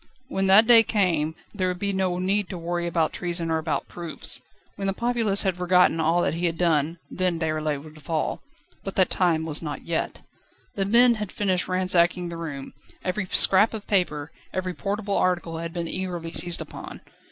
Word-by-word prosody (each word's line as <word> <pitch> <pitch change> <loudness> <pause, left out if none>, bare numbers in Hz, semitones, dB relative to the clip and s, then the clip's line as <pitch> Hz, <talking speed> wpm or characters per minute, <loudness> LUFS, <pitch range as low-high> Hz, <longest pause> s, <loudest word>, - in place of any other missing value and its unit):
When 195 0 0
that 200 +4 +7
day 235 -1 +8
came 175 -8 +1 0.2
there 190 -3 -1
would 180 0 -2
be 200 +1 -1
no 185 -2 0
need 195 +1 0
to 185 - -5
worry 175 0 -2
about 165 -2 0
treason 170 -2 -3
or 160 - +1
about 155 -3 -2
proofs. 170 -2 -4 0.3
When 195 - -3
the 195 - +1
populace 230 -3 +1
had 190 -2 +1
forgotten 180 -2 +3
all 165 +2 +2
that 140 - 0
he 170 +2 0
had 165 -1 -3
done, 165 -1 +1
then 180 -2 -1
Déroulède 155 -3 -1
would 155 0 -13
fall. 155 +2 -2 0.4
But 195 - -6
that 185 - +3
time 165 -3 +1
was 155 -1 -3
not 150 -3 -6
yet. 170 -1 -3 0.5
The 195 - -1
men 240 +4 +6
had 210 - -4
finished 185 -3 0
ransacking 180 -1 +2
the 170 - -6
room; 150 -5 -6 0.3
every 185 +1 -2
scrap 205 +5 +4
of 210 - -7
paper, 160 -7 0 0.2
every 185 -1 -3
portable 200 +3 -2
article 175 -3 0
had 165 0 -5
been 170 -1 -4
eagerly 175 -2 -4
seized 175 +1 -1
upon. - - -9
180 Hz, 190 wpm, -25 LUFS, 165-190 Hz, 0.5 s, day